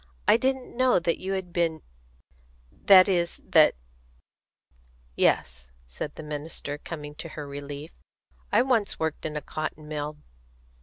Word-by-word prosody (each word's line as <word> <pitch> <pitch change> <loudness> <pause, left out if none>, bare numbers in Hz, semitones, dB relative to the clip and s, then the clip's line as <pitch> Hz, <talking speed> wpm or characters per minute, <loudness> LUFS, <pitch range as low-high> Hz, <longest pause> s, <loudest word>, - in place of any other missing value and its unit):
I - - +7
didn't 260 +1 -1
know 255 -2 +4
that 170 -1 0
you 190 +1 -3
had 185 -2 -4
been 165 -2 0 0.9
that 185 - +7
is, 175 -3 0
that - - +6 0.7
" - - -35
"Yes," 60 -1 0 0.2
said 60 - -6
the - - -8
minister, 150 -1 -5
coming 150 -3 -7
to 165 +3 -7
her 150 -2 -7
relief, 145 +2 -7 0.6
"I - - +5
once 235 -6 +1
worked 160 -1 -2
in 155 - -7
a - - -3
cotton 155 0 -5
mill. 150 0 -4
155 Hz, 145 wpm, -27 LUFS, 145-185 Hz, 0.9 s, I